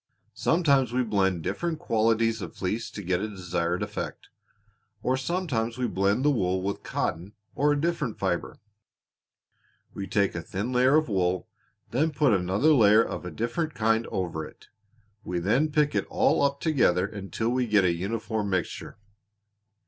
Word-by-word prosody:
Sometimes 140 Hz, -7 st, +2 dB
we 125 Hz, +1 st, +1 dB
blend 95 Hz, -6 st, 0 dB
different 170 Hz, -, -2 dB
qualities 115 Hz, -6 st, +1 dB
of -, -, -8 dB
wool 95 Hz, +2 st, 0 dB, 0.2 s
to 105 Hz, -, -7 dB
get 90 Hz, 0 st, 0 dB
a 110 Hz, -, -2 dB
desired 90 Hz, -3 st, -2 dB
effect, -, -, -6 dB, 0.7 s
or 130 Hz, -, +2 dB
sometimes 130 Hz, -6 st, -2 dB
we 125 Hz, -, 0 dB
blend 100 Hz, +7 st, +1 dB
the 150 Hz, -, +5 dB
wool 95 Hz, -7 st, 0 dB
with 100 Hz, +1 st, -3 dB
cotton 90 Hz, +5 st, -3 dB, 0.2 s
or 145 Hz, +1 st, +2 dB
a 145 Hz, -, +1 dB
different 155 Hz, -7 st, -1 dB
fiber. 95 Hz, -3 st, -2 dB, 1.4 s
We 95 Hz, -, -5 dB
take 100 Hz, -1 st, +1 dB
a 85 Hz, -, -4 dB
thin 100 Hz, +8 st, -4 dB
layer 130 Hz, +3 st, +4 dB
of 155 Hz, 0 st, +3 dB
wool, 95 Hz, -4 st, 0 dB, 0.4 s
then 150 Hz, +7 st, +2 dB
put 140 Hz, -5 st, +2 dB
another 95 Hz, -, +3 dB
layer 110 Hz, -4 st, +6 dB
of -, -, -5 dB
a -, -, -4 dB
different 120 Hz, -, -3 dB
kind 110 Hz, +1 st, +1 dB
over 85 Hz, -4 st, -3 dB
it. -, -, -13 dB, 0.5 s
We 90 Hz, -, -3 dB
then 115 Hz, -, +1 dB
pick 150 Hz, -1 st, +2 dB
it -, -, -1 dB
all -, -, +2 dB
up 140 Hz, 0 st, +1 dB
together 110 Hz, -, +2 dB
until 100 Hz, +2 st, -3 dB
we 125 Hz, 0 st, 0 dB
get 105 Hz, -3 st, +4 dB
a 85 Hz, -, +3 dB
uniform 105 Hz, +3 st, -3 dB
mixture." 95 Hz, +1 st, -3 dB
110 Hz, 165 wpm, -27 LUFS, 95-135 Hz, 1.4 s, layer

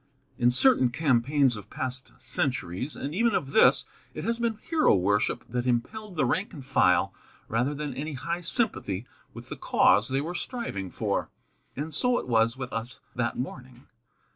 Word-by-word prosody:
In 120 Hz, -, +5 dB
certain 130 Hz, -, +4 dB
campaigns 135 Hz, 0 st, +2 dB
of 105 Hz, -1 st, -10 dB
past 130 Hz, 0 st, -4 dB
centuries, 125 Hz, -, -2 dB
and 145 Hz, -, -5 dB
even 230 Hz, +4 st, +2 dB
of 135 Hz, -, -2 dB
this, 220 Hz, -, +5 dB, 0.3 s
it -, -, -5 dB
has 230 Hz, +1 st, -1 dB
been 230 Hz, -2 st, 0 dB
hero 320 Hz, -, +3 dB
worship 100 Hz, +3 st, +1 dB
that 125 Hz, +1 st, -2 dB
impelled 185 Hz, -, -2 dB
the 155 Hz, -4 st, +2 dB
rank 185 Hz, -, -1 dB
and 140 Hz, -6 st, -9 dB
file 90 Hz, -8 st, +3 dB, 0.3 s
rather 125 Hz, +6 st, 0 dB
than 145 Hz, -1 st, -4 dB
any 150 Hz, +4 st, -4 dB
high 170 Hz, +6 st, -3 dB
sympathy 145 Hz, -, 0 dB, 0.3 s
with -, -, -10 dB
the -, -, -6 dB
cause 105 Hz, +4 st, +4 dB
they 135 Hz, +1 st, +1 dB
were 160 Hz, +5 st, -3 dB
striving 180 Hz, -, -4 dB
for. -, -, -2 dB, 0.5 s
And 150 Hz, +4 st, -4 dB
so 250 Hz, -1 st, +2 dB
it -, -, -4 dB
was 115 Hz, 0 st, +2 dB
with 130 Hz, -2 st, -6 dB
us 115 Hz, +3 st, -4 dB, 0.2 s
that 120 Hz, -1 st, -1 dB
morning. 125 Hz, 0 st, -7 dB
130 Hz, 170 wpm, -27 LUFS, 120-170 Hz, 0.5 s, In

